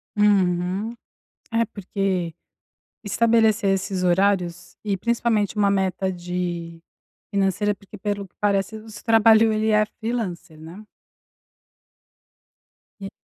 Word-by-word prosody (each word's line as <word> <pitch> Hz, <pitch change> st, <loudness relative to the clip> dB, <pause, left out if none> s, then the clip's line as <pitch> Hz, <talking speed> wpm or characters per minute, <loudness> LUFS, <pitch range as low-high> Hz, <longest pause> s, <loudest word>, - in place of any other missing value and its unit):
Uhum, 195 Hz, 0 st, +2 dB, 0.6 s
é 230 Hz, 0 st, +2 dB
porque 190 Hz, -4 st, -2 dB, 0.7 s
estabelecer 225 Hz, 0 st, +2 dB
esses 190 Hz, -1 st, -2 dB
horários 180 Hz, -1 st, +1 dB
e 200 Hz, -2 st, -1 dB
principalmente 225 Hz, -1 st, 0 dB
uma 200 Hz, -1 st, +3 dB
meta 190 Hz, -1 st, 0 dB
de 175 Hz, -2 st, -5 dB, 0.5 s
financeira, 200 Hz, +1 st, +1 dB
porque 200 Hz, +1 st, -14 dB
pelo 205 Hz, -1 st, -3 dB
que 175 Hz, -, -33 dB
parece 200 Hz, +1 st, 0 dB
esse 215 Hz, 0 st, -11 dB
trabalho 225 Hz, -1 st, +5 dB
ele 215 Hz, +1 st, 0 dB
é 215 Hz, 0 st, +4 dB
freelancer, 205 Hz, -8 st, -5 dB
né? 170 Hz, +7 st, -11 dB, 2.2 s
E. 195 Hz, 0 st, -6 dB
200 Hz, 105 wpm, -23 LUFS, 180-215 Hz, 2.2 s, trabalho